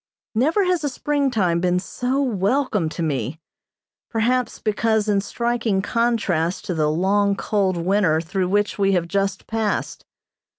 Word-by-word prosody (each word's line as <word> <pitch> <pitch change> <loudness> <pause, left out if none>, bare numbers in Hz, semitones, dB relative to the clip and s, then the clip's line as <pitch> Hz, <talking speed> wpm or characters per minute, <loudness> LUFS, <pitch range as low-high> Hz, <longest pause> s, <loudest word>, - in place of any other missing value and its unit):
Never 305 - +2
has 360 -3 +1
a 290 - 0
springtime 255 -12 0
been 180 0 +1
so 250 +8 -1
welcome 210 - 0
to 170 - -4
me, 140 -1 -2 0.7
perhaps 245 +2 0
because 220 0 0
in 200 -2 +2
striking 230 -3 -1
contrast 200 -8 0
to 180 - -2
the 155 -2 +1
long, 200 +5 +2
cold 195 -4 0
winter 175 -2 +2
through 180 +2 -2
which 205 +1 0
we 195 0 +3
have 175 -2 +1
just 195 +2 -1
passed. 220 -2 -2
205 Hz, 140 wpm, -22 LUFS, 180-235 Hz, 0.7 s, we